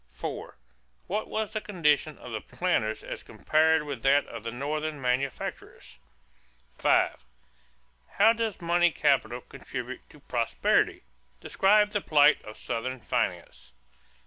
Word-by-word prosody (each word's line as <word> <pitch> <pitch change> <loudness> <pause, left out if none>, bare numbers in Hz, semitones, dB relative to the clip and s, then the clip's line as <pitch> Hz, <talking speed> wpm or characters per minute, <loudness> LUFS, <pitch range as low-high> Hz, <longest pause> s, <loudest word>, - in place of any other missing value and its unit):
4. 60 - -6 0.5
What 210 +4 -2
was 215 -1 -3
the 215 - -2
condition 155 -7 +1
of 125 - -10
the 110 -1 -4
planters 110 -12 -1
as - - -6
compared 160 0 +2
with 140 -5 -6
that 140 +3 +4
of 115 - -8
the 115 - -5
Northern 150 +5 -3
manufacturers? 125 - -3 0.8
5. - - +2 0.9
How 220 +3 +6
does 225 -5 -3
money 175 +1 +3
capital 160 - +1
contribute - - -7
to - - -16
prosperity? - - +1 0.4
Describe 210 - +3
the 205 - -1
plight 150 -3 +5
of 110 - -10
Southern 130 +3 -4
finance. 110 - -3
150 Hz, 125 wpm, -28 LUFS, 125-185 Hz, 0.9 s, How